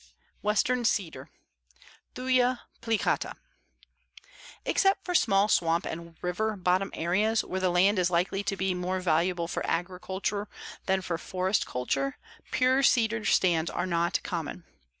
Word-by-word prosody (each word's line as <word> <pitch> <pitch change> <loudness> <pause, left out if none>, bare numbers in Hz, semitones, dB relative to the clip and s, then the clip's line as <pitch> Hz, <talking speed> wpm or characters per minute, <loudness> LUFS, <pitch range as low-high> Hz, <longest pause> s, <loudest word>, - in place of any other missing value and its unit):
WESTERN 235 +4 +1
CEDAR 170 - -1 0.9
(Thuya 255 -1 +2 0.2
plicata) 225 -2 0 1.3
Except 390 0 +2
for 360 - -2
small 200 - +4
swamp 170 -4 +2
and 170 0 -7
river 210 +5 -1
bottom 185 +1 +1
areas, 205 +7 +1
where 190 - -3
the 185 -1 +2
land 185 +3 +3
is 180 -1 +2
likely 180 +3 0
to 200 -1 -1
be 190 0 0
more 180 +1 -2
valuable 170 0 +1
for - - -3
agriculture 190 +3 -2 0.4
than 190 0 +2
for 170 -2 -3
forest 185 +3 -1
culture, 135 +2 -2 0.3
pure 260 +1 +3
cedar 225 -4 +3
stands 170 -4 +3
are - - -2
not 170 -1 +1
common. 170 0 -4
185 Hz, 130 wpm, -28 LUFS, 175-215 Hz, 1.3 s, small